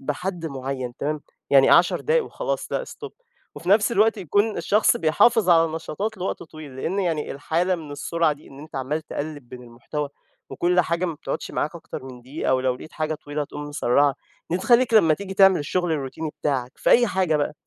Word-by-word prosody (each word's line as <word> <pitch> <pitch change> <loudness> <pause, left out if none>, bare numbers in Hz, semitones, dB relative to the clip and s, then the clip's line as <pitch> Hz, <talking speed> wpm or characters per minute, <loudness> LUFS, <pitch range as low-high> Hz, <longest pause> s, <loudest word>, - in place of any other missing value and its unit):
بحد 170 +4 -3
معيّن 130 -3 -5
تمام، 150 +1 -2 0.3
يعني، 135 -1 +6
10 175 +1 +5
دقايق 475 +1 +2
وخلاص، - - -4
لأ - - -1
stop. - - -9 0.4
وفي 175 - -8
نَفْس 210 +3 +4
الوقت 220 +1 +3
يكون 205 +5 +1
الشخص 210 +1 +3
بيحافظ 185 +6 +3
على 165 -2 +5
نشاطات 200 +7 -4
لوقت 185 - -3
طويل، 155 -5 -11
لإن 180 +9 -2
يعني 165 -5 -1
الحالة 165 +6 0
من 155 -4 -7
السرعة 160 +2 0
دي، 145 - -13
إن 135 - -13
أنت 155 0 -10
عمّال 140 +4 -2
تقلّب 145 -4 -6
بين 125 -1 -10
المحتوى 125 +5 -5 0.4
وكل 180 +1 +2
حاجة 170 +1 -1
ما 170 - -2
بتقعدش 150 - -5
معاك 155 - -2
أكتر 160 -5 -8
من 125 -2 -10
دقيقة، 130 0 -1
ولو 130 -1 +1
لقيت 155 - -12
حاجة 155 0 -2
طويلة 145 0 -4
تقوم 145 - -8
مسرّعها، 140 0 +2 0.4
دي 175 - +2
تخليك 240 +3 +3
لما 165 -8 +6
تيجي 195 +2 -7
تعمل 195 -4 +6
الشغل 175 +3 -1
الروتيني 150 +2 -3
بتاعك 130 -3 -1
في - - 0
أي 240 0 +6
حاجة 185 -6 +1
بقى، 145 0 -1
155 Hz, 195 wpm, -23 LUFS, 145-185 Hz, 0.4 s, يعني